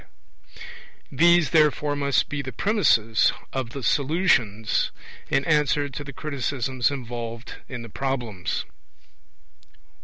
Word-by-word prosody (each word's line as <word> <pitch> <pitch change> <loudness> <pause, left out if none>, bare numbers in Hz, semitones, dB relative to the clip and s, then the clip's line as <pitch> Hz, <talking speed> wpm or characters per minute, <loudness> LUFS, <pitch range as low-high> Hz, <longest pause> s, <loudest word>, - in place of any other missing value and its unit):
These, 170 0 +4
therefore, 150 -2 +3
must 140 -2 +1
be 145 -1 -3
the 130 -1 -6
premisses 115 - +2 0.2
of 130 -3 -2
the 135 +2 -7
Solutions 130 - +1 0.4
in 135 - +1
answer 150 -2 +2
to 140 +2 -6
the 140 - -8
criticisms 130 -2 -1
involved 120 -3 -6
in 125 -3 -6
the - - -8
Problems. 120 -6 -3
135 Hz, 110 wpm, -24 LUFS, 120-145 Hz, 0.4 s, These